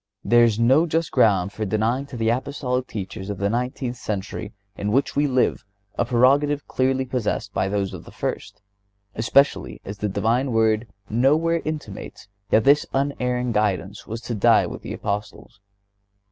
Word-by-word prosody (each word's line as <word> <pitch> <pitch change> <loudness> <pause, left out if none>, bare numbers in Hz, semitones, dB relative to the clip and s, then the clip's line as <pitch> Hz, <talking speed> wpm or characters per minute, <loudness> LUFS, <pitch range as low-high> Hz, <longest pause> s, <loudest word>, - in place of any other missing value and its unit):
There 120 0 +5
is 110 -3 +1
no 130 +8 +4
just 165 +1 -1
ground 100 -2 +3
for 110 - -4
denying 110 +7 0
to 130 - -8
the 115 -1 +1
Apostolic 125 0 -1
teachers 95 -1 -6
of 100 - -3
the 100 +1 0
nineteenth 125 +1 -2
century 100 -3 -4 0.2
in 100 +1 -2
which 135 +5 +1
we 145 +1 +2
live 130 -4 +1 0.3
a - - +1
prerogative 140 +4 +3
clearly 130 0 0
possessed 115 -4 -2
by 95 - 0
those 100 -1 -1
of - - -8
the - - -12
first, 100 0 -5 0.5
especially 140 +6 +2
as 100 +1 -7
the 105 - -1
Divine 120 +6 0
Word 110 0 +2 0.2
nowhere 155 +9 +2
intimates 145 -10 -6 0.2
that 110 - +4
this 145 +4 +4
unerring 125 -3 0
guidance 105 -2 -1
was 115 +1 -5
to 120 - -5
die 105 - +4
with - - -7
the - - -6
Apostles. 105 +1 -5
120 Hz, 165 wpm, -23 LUFS, 105-130 Hz, 0.5 s, There